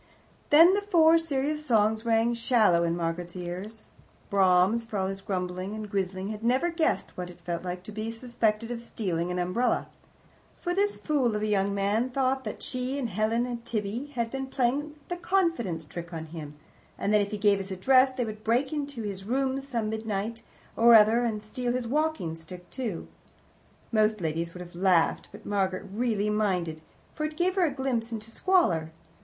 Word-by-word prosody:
Then 330 +5 +8
the 405 - +1
Four 330 -5 +5
Serious 300 -1 -1
Songs 220 -4 +2
rang 230 +1 +3
shallow 225 -7 +3
in 170 0 +1
Margaret's 170 +1 -3
ears. 185 +5 -6 0.4
Brahms, 190 +3 +4
for 225 -2 -5
all 190 - 0
his 195 0 -4
grumbling 185 0 -3
and 215 -1 -5
grizzling, 190 0 -2
had 215 0 -6
never 260 +9 +2
guessed 330 -1 0
what 180 -1 -5
it 175 - -13
felt 170 0 -3
like 180 0 -5
to 215 - -9
be 215 +2 -4
suspected 230 -1 -1
of 235 -1 -4
stealing 180 -7 -2
an 180 - -2
umbrella. 185 +8 0 0.7
For 350 - -2
this 405 +2 +1
fool 265 -8 +1
of 210 - -2
a - - +1
young 200 -1 +1
man 205 +5 +1
thought 265 0 0
that - - -6
she 255 +2 -3
and 255 -4 -2
Helen 220 +4 +1
and 240 -2 -5
Tibby 225 +4 -3
had 235 -1 -1
been 270 0 -3
playing 275 +4 0
the 350 - -3
confidence 335 - 0
trick 170 +2 -8
on 160 -2 -5
him, 155 -2 -8 0.4
and 205 - 0
that 210 - +5
if 200 - -1
he 210 - -4
gave 200 -1 +3
his 195 0 -4
address 255 +8 +4
they 255 -2 -2
would 215 -1 -7
break 245 +6 +1
into 285 -5 -4
his 195 -2 -5
rooms 270 +3 -1
some 230 -5 -1
midnight 220 +1 -3 0.3
or 235 0 +7
other 220 +2 +6
and 215 -3 -2
steal 240 +3 -2
his 250 -1 -2
walkingstick 180 - -2
too. 230 -10 -4 0.8
Most 215 -1 +3
ladies 165 0 -2
would 180 - -7
have 175 0 -10
laughed, 175 -2 +2
but 205 +2 -13
Margaret 190 -2 -1
really 215 -2 0
minded, 180 -7 0 0.3
for 305 - -4
it 305 0 -3
gave 360 +2 +2
her 375 -2 +3
a - - -1
glimpse 260 -4 -2
into 225 0 -6
squalor. 180 - +2
220 Hz, 190 wpm, -28 LUFS, 190-255 Hz, 0.8 s, Then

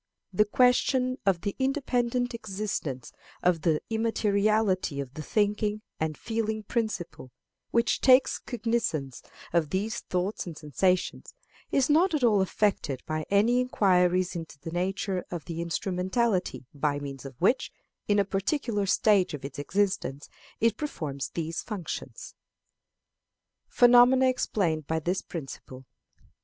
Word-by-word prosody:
The 210 +3 +4
question 255 +3 +2
of 180 -3 +3
the 200 0 -3
independent 250 -3 0
existence 195 - -4 0.3
and 180 0 +4
the 155 -2 +1
immateriality 215 -6 +1
of 135 -2 -5
the 155 - -6
thinking 210 +4 0 0.2
and 155 -1 -2
feeling 220 -1 -2
principle, 210 - -3 0.4
which 235 0 +1
takes 260 0 +5
cognizance 225 - -2 0.3
of 165 -4 +2
these 205 +7 -2
thoughts 185 +2 -3
and 165 -3 -7
sensations, 180 +5 -1 0.4
is 275 -1 +3
not 325 +3 +3
at 290 - -1
all 210 -5 +4
affected 190 -8 0
by 155 0 -3
any 220 +5 +3
inquiries 185 -6 +2
into 165 -3 -7
the 160 +3 -8
nature 185 +1 -1
of 170 -4 -6
the 165 -1 -4
instrumentality 185 - -1
by 145 0 0
means 140 -2 -7
of 135 -3 -10
which, 220 +9 +2 0.4
in 205 - +3
a 200 - +3
particular 205 +1 -1
stage 195 -4 +3
of 135 - -9
its 140 0 -7
existence, 165 -5 -1 0.3
it 230 -1 +2
performs 150 - -4
these 165 0 -3
functions. 200 -7 -6 1.3
Phenomena 245 +2 +6
explained 170 - -1
by 160 - 0
this 175 +4 -1
Principle. 135 -4 -8
195 Hz, 130 wpm, -28 LUFS, 165-230 Hz, 1.3 s, Phenomena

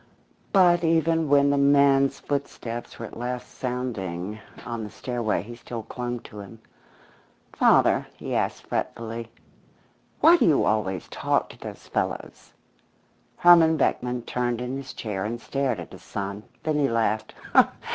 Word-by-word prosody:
But 175 -3 +5
even 165 -1 +2
when 140 0 +5
the 140 - +2
man's 140 -1 +4
footsteps 120 -4 -4
were 115 - -6
at - - -11
last 125 +1 -4
sounding 110 -6 -4 0.3
on 115 -2 -4
the 105 - -6
stairway, 115 -6 -2
he 120 +3 -9
still 115 -1 -7
clung 120 0 -5
to 105 - -11
him. 100 +3 -10 0.9
"Father," - - +4
he - - -5
asked, - - -1
fretfully, 115 0 -4 0.9
"why 340 +2 +7
do - - +3
you 150 -4 +4
always 95 -5 0
talk - - 0
to - - -14
those - - -9
fellows?" - - -4 0.9
Herman 165 -2 +6
Beckman 125 -3 0
turned 120 -1 -1
in 125 +1 -3
his 135 -1 -7
chair 100 -4 -4
and 115 +3 -3
stared 135 -5 -1
at 85 - -8
his - - -12
son. 100 +1 -5 0.2
Then 155 -1 0
he 140 - +2
laughed. 110 -2 0
125 Hz, 145 wpm, -25 LUFS, 110-140 Hz, 0.9 s, why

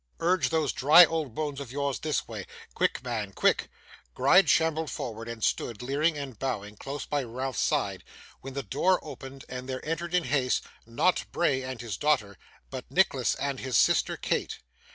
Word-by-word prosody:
Urge 180 +2 +2
those 160 -4 +1
dry 155 +7 +8
old 155 -8 -3
bones 145 -3 -3
of 135 -4 -7
yours 140 0 -2
this 155 -1 -1
way. - - -7 0.3
Quick, - - 0
man, 110 -5 -3
quick!' - - +2 0.5
Gride 160 +6 +5
shambled 160 0 +2
forward, 115 -1 -5
and 115 -2 -6
stood, 120 0 -1
leering 150 +5 +1
and 135 -6 -7
bowing, 105 -6 -3
close 140 +6 -6
by 145 -1 -1
Ralph's 130 +1 -4
side, - - 0 0.4
when 135 0 -9
the 140 - -2
door 180 - +2
opened 135 -3 -9
and 125 +1 -7
there 130 +2 -5
entered 170 +2 -2
in 180 - +3
haste 130 -2 +1 0.2
not 115 +11 +1
Bray 140 -6 +1
and 130 -2 -6
his 110 -6 -5
daughter, 110 -10 0 0.3
but - - -7
Nicholas - - +2
and 140 -2 -3
his 130 -6 0
sister - - +3
Kate. - - -2
135 Hz, 175 wpm, -28 LUFS, 125-155 Hz, 0.5 s, dry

